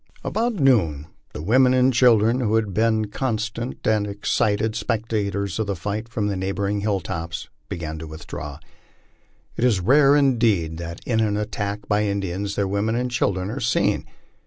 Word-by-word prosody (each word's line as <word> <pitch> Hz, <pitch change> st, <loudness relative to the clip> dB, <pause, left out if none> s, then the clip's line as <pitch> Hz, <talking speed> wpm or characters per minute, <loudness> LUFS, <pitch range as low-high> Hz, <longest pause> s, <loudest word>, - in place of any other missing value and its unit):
About 230 Hz, +1 st, -1 dB
noon 105 Hz, -, +2 dB, 0.3 s
the 75 Hz, -, -7 dB
women 130 Hz, +6 st, +4 dB
and 130 Hz, +1 st, +4 dB
children, 115 Hz, -1 st, +4 dB
who 110 Hz, -3 st, +1 dB
had 110 Hz, -4 st, 0 dB
been 110 Hz, 0 st, +2 dB
constant 115 Hz, 0 st, -3 dB
and 105 Hz, -1 st, +2 dB
excited 105 Hz, +1 st, 0 dB
spectators 105 Hz, -3 st, -2 dB
of 110 Hz, -, -1 dB
the 100 Hz, -, -1 dB
fight 105 Hz, +7 st, -4 dB
from 110 Hz, -3 st, -2 dB
the 100 Hz, -1 st, -1 dB
neighboring 100 Hz, +2 st, -1 dB
hilltops, 95 Hz, -5 st, -3 dB, 0.2 s
began 80 Hz, -2 st, -5 dB
to 80 Hz, -, -7 dB
withdraw. 75 Hz, -2 st, -7 dB, 1.0 s
It -, -, -1 dB
is 120 Hz, -6 st, +3 dB
rare 135 Hz, +8 st, +5 dB
indeed 115 Hz, -, +2 dB
that 85 Hz, 0 st, -6 dB
in 115 Hz, -3 st, +1 dB
an 105 Hz, -2 st, +1 dB
attack 105 Hz, -1 st, -3 dB
by 105 Hz, 0 st, +2 dB
Indians 100 Hz, 0 st, -2 dB
their 100 Hz, -1 st, 0 dB
women 100 Hz, +3 st, 0 dB
and 125 Hz, +1 st, -1 dB
children 100 Hz, -5 st, 0 dB
are 135 Hz, -, -4 dB
seen. 115 Hz, -, +1 dB
105 Hz, 160 wpm, -23 LUFS, 95-115 Hz, 1.0 s, rare